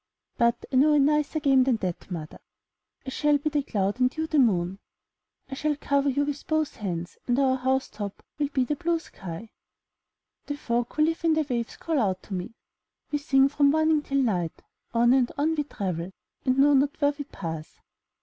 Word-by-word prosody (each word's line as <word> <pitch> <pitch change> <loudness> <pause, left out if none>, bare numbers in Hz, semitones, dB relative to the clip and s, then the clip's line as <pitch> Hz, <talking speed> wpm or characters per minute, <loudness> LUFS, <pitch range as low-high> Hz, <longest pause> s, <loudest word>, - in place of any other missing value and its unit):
But 235 0 +1
I - - +4
know 300 +3 +5
a 295 - +5
nicer 300 +2 +2
game 270 -3 +4
than 255 -2 +2
that, 185 -5 -4
mother. 160 -4 -6 0.7
I 265 - -5
shall 295 +2 +2
be 305 +2 -2
the 295 -1 +1
cloud 205 -3 -1
and 255 +4 +1
you 315 - 0
the 310 -2 +1
moon. 190 -6 +2 0.7
I 270 - -8
shall 300 +2 0
cover 280 0 +1
you 285 +2 +1
with 290 0 -5
both 315 -1 0
hands, 175 -4 -5
and 245 0 +2
our 265 -1 +3
house 260 +1 0
top 205 -2 -7 0.2
will 290 - +2
be 275 -2 0
the 295 +4 -1
blue 340 +2 0
sky. 195 - -9 1.0
The 290 - -3
folk 240 -3 -2
who 305 - +3
live 325 +2 0
in 325 -1 +3
the 310 -1 +1
waves 235 -2 -3
call 320 -3 -1
out 190 -5 0
to 200 - -8
me 185 +5 -5 0.3
— - - -49
*'We 295 - 0
sing 270 -2 +4
from 285 0 +3
morning 315 0 +3
till 275 -1 -2
night; 180 -8 -1 0.3
on 240 +1 +4
and 260 -2 +3
on 305 +3 +2
we 295 -2 -1
travel 185 - -4 0.4
and 255 0 +2
know 285 +2 +6
not 280 +2 +2
where 290 0 +3
we 285 -1 -6
pass.'' 160 - -7
270 Hz, 205 wpm, -26 LUFS, 220-295 Hz, 1.0 s, know